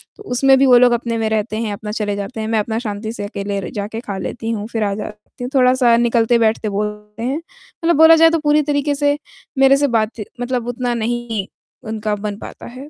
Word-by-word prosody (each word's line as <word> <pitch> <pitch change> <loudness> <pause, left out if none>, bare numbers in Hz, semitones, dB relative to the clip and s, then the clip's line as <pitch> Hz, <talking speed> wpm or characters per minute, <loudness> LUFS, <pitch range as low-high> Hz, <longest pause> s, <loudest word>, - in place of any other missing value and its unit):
तो 420 - -13
उसमें 270 +2 +4
भी 275 - +5
वो 250 -2 +7
लोग 245 0 +5
अपने 235 -1 -1
में 225 -1 0
रहते 215 0 -1
हैं, 225 -2 -2
अपना 210 +1 -6
चले 210 -2 -2
जाते 205 +4 -6
हैं। 220 - -3
मैं 220 -1 +1
अपना 220 +1 -2
शांति 215 -1 -4
से 220 - -6
अकेले 200 -1 -4
र - - -6
जाके 210 +2 -4
खा 200 -5 -5
लेती 225 +4 -5
हूँ 210 -2 -3
फ़िर 225 -2 -1
आ 200 -1 0
जाती 210 +3 -9
हूँ, 245 - -3
थोड़ा-सा 250 -2 +4
निकलते, 235 0 +3
बैठते 220 -1 +1
बोलते 210 +1 -4
हैं। 265 +5 -1
मतलब 360 -3 -4
बोला 320 +1 +8
जाए 325 0 +6
तो 330 0 0
पूरी 300 0 +3
तरीके 290 0 0
से 290 0 +1 0.4
मेरे 270 0 +6
से 285 0 +2
बातची 220 -2 -1 0.2
मतलब 245 -1 -2
उतना 245 0 -2
नहीं 230 -3 -2 0.4
उनका 215 -1 -2
बन 205 0 -5
पाता - - -10
है, 260 +4 -10
230 Hz, 230 wpm, -18 LUFS, 210-260 Hz, 0.4 s, बोला